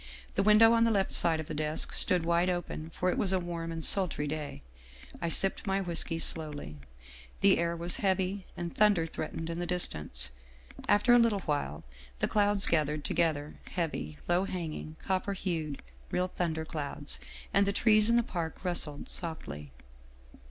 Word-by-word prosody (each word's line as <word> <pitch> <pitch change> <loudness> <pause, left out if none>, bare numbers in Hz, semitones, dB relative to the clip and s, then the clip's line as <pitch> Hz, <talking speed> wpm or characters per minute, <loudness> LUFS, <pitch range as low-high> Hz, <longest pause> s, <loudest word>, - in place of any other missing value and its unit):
The - - +1
window 215 +3 +6
on 230 0 +4
the 230 - +4
left 200 -3 0
side 165 -2 +3
of 160 - -4
the - - -6
desk 155 +1 -2
stood 180 -3 +3
wide 170 +2 +2
open, 175 -3 -4
for 180 +2 -1
it - - -2
was 190 - +2
a 190 - +2
warm 170 -1 -5
and 165 -1 -1
sultry 180 -6 +5
day. 150 - -5 0.6
I 170 - -1
sipped 195 +5 +1
my 195 0 +1
whisky 170 -3 0
slowly. 150 - -2 0.6
The - - +5
air 170 0 0
was 170 +1 0
heavy, 190 0 -1
and 170 -1 -5
thunder 205 -6 +4
threatened 165 0 -5
in 165 - -4
the 175 - -3
distance. 75 - -2 0.6
After 205 +4 +5
a 245 - +7
little 225 -4 +2
while 145 - -3 0.3
the - - 0
clouds 205 -1 +4
gathered 150 -2 0
together, 155 -3 -1
heavy, 75 - -4
low 175 +2 +2
hanging, 160 -4 -5
copper 190 +1 -1
hued, 165 -7 -4 0.3
real 180 0 0
thunder 165 -3 -3
clouds, 140 - -5 0.3
and 200 0 +3
the - - +2
trees 215 +1 +4
in 235 - +4
the 240 - +3
park 170 -3 -5
rustled 160 -5 0
softly. 75 - -5
170 Hz, 175 wpm, -30 LUFS, 155-195 Hz, 0.6 s, a